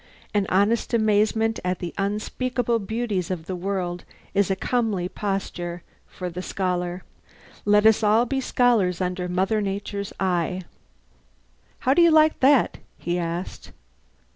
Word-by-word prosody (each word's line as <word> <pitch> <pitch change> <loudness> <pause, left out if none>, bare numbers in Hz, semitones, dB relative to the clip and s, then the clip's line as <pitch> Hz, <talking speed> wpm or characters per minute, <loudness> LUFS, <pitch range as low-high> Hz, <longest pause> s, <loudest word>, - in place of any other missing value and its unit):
An 205 -2 +1
honest 210 +5 +2
amazement 220 +1 +2
at 180 0 -1
the 175 -1 -6
unspeakable 230 +4 -1
beauties 215 -4 -2
of 175 -4 -4
the 185 - -4
world 180 -1 -3 0.3
is 200 -1 +2
a 190 - +2
comely 215 -4 -1
posture 180 -3 -4 0.2
for 180 - -6
the 180 +2 -5
scholar. 180 -1 -2 0.6
Let 210 +1 +4
us 220 0 +5
all 220 +3 +4
be 265 +2 -1
scholars 230 -9 +2
under 180 -1 -2
Mother 190 +4 +1
Nature's 200 0 -4
eye. 180 -1 0 1.2
"How 260 - +3
do 345 - +4
you 340 - +7
like 310 -1 +4
that?" 270 -1 +4 0.2
he 175 +1 -2
asked. 170 +2 -5
200 Hz, 140 wpm, -24 LUFS, 180-225 Hz, 1.2 s, you